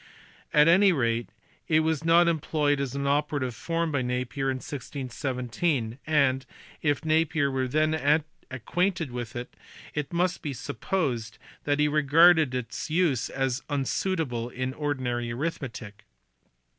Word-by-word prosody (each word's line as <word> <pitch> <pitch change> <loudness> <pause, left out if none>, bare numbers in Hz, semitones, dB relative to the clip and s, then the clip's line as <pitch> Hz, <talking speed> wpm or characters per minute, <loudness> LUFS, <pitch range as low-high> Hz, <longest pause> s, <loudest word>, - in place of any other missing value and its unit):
At 150 +1 +5
any 190 +4 +6
rate 120 -6 0 0.4
it 155 -1 +4
was 160 -1 0
not 170 +1 +5
employed 150 -3 +1
as 140 -1 -3
an 140 0 -2
operative 145 -3 0
form 165 +7 -2
by 140 -3 0
Napier 125 +2 -2
in 130 - 0
1617, 130 -1 -3
and, 140 -4 +2 0.4
if 145 0 0
Napier 155 -2 +2
were 130 -1 -1
then 155 +1 +2 0.3
acquainted 170 - -1
with 120 0 -6
it, 120 +1 -6 0.4
it 150 -2 -3
must 175 +1 0
be 145 -3 -4
supposed 135 - -3 0.3
that 145 0 +1
he 150 0 +3
regarded 155 0 +5
its 125 +5 -4
use 155 -7 +1
as 135 0 -1
unsuitable 140 -3 -1
in 130 +1 -3
ordinary 130 -5 -2
arithmetic*. 125 -7 -5
145 Hz, 130 wpm, -27 LUFS, 125-160 Hz, 0.4 s, any